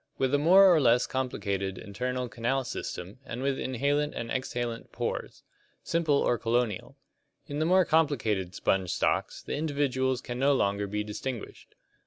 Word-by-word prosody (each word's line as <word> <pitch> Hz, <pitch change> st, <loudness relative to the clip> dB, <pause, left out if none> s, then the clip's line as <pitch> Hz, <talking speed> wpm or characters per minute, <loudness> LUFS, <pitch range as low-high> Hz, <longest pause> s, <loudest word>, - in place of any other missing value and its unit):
With 130 Hz, 0 st, 0 dB
a 145 Hz, -, +4 dB
more 180 Hz, +6 st, +7 dB
or 160 Hz, -, +4 dB
less 120 Hz, -1 st, +4 dB
complicated 100 Hz, -7 st, -2 dB
internal 125 Hz, +4 st, -3 dB
canal 120 Hz, +3 st, -1 dB
system 100 Hz, -2 st, -6 dB
and 125 Hz, -1 st, -6 dB
with 135 Hz, -1 st, 0 dB
inhalent 140 Hz, +4 st, 0 dB
and 115 Hz, -, -4 dB
exhalent 120 Hz, -3 st, -3 dB
pores. -, -, -4 dB, 0.4 s
Simple 165 Hz, -3 st, +1 dB
or 120 Hz, -3 st, +2 dB
colonial. 115 Hz, -4 st, -1 dB, 0.5 s
In 145 Hz, +1 st, -4 dB
the 155 Hz, -, +1 dB
more 185 Hz, +1 st, +5 dB
complicated 110 Hz, -, +1 dB
sponge 95 Hz, -2 st, 0 dB
stocks -, -, 0 dB
the -, -, -5 dB
individuals 140 Hz, -4 st, 0 dB
can 120 Hz, -1 st, -6 dB
no 140 Hz, +1 st, +4 dB
longer 100 Hz, -3 st, 0 dB
be 105 Hz, +1 st, -2 dB
distinguished. 110 Hz, +3 st, -7 dB
125 Hz, 155 wpm, -28 LUFS, 110-140 Hz, 0.5 s, more